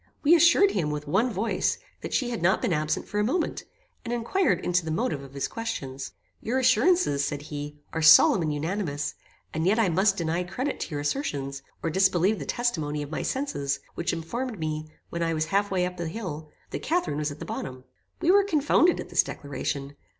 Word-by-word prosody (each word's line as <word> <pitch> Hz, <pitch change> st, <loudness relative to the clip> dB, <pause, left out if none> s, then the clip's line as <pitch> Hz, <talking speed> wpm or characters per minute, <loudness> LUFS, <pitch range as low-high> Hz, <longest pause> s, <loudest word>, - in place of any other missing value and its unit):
We 305 Hz, +3 st, +6 dB
assured 345 Hz, +4 st, +6 dB
him, 155 Hz, -, 0 dB
with 150 Hz, 0 st, -4 dB
one 220 Hz, -, +2 dB
voice, 220 Hz, +2 st, 0 dB, 0.2 s
that -, -, -6 dB
she 245 Hz, -3 st, 0 dB
had 230 Hz, -, -3 dB
not 185 Hz, +4 st, +3 dB
been 180 Hz, -, 0 dB
absent 155 Hz, 0 st, -1 dB
for 210 Hz, -, -2 dB
a -, -, +3 dB
moment, 330 Hz, +11 st, -1 dB, 0.4 s
and 235 Hz, -, -5 dB
inquired 240 Hz, -, +1 dB
into 180 Hz, 0 st, +2 dB
the 160 Hz, -, -5 dB
motive 155 Hz, -2 st, -1 dB
of 135 Hz, 0 st, -12 dB
his 140 Hz, -, -1 dB
questions. 140 Hz, -13 st, -5 dB, 0.3 s
"Your 245 Hz, +4 st, -1 dB
assurances," 260 Hz, -, +3 dB
said 145 Hz, 0 st, -3 dB
he, 145 Hz, 0 st, -6 dB, 0.2 s
"are 160 Hz, -, -1 dB
solemn 160 Hz, +3 st, +8 dB
and 155 Hz, -2 st, 0 dB
unanimous; 150 Hz, -1 st, -2 dB, 0.4 s
and 160 Hz, +2 st, 0 dB
yet 210 Hz, +4 st, +3 dB
I 225 Hz, -5 st, +3 dB
must 195 Hz, +4 st, +3 dB
deny 170 Hz, +1 st, 0 dB
credit 255 Hz, +11 st, -3 dB
to -, -, -4 dB
your 145 Hz, -3 st, -3 dB
assertions, 140 Hz, -, -2 dB, 0.2 s
or 165 Hz, -, 0 dB
disbelieve 190 Hz, +3 st, +3 dB
the -, -, -6 dB
testimony 155 Hz, -12 st, -1 dB
of 145 Hz, -, -9 dB
my -, -, -2 dB
senses, 140 Hz, -, -2 dB
which 170 Hz, -, -1 dB
informed 225 Hz, +9 st, -4 dB
me, 155 Hz, -1 st, -3 dB, 0.2 s
when 170 Hz, -, -3 dB
I 165 Hz, -1 st, +1 dB
was 155 Hz, 0 st, 0 dB
half 200 Hz, +4 st, +1 dB
way 185 Hz, -2 st, +1 dB
up 180 Hz, 0 st, -5 dB
the 170 Hz, -2 st, -3 dB
hill, 160 Hz, -5 st, -6 dB, 0.2 s
that -, -, -4 dB
Catharine 330 Hz, -, 0 dB
was 150 Hz, 0 st, -1 dB
at 145 Hz, -, -8 dB
the -, -, -7 dB
bottom." 130 Hz, -1 st, -6 dB, 0.4 s
We 350 Hz, +1 st, +4 dB
were 400 Hz, +1 st, +6 dB
confounded 325 Hz, -1 st, +3 dB
at -, -, -6 dB
this -, -, +4 dB
declaration. 140 Hz, 0 st, -5 dB
170 Hz, 210 wpm, -26 LUFS, 150-230 Hz, 0.4 s, solemn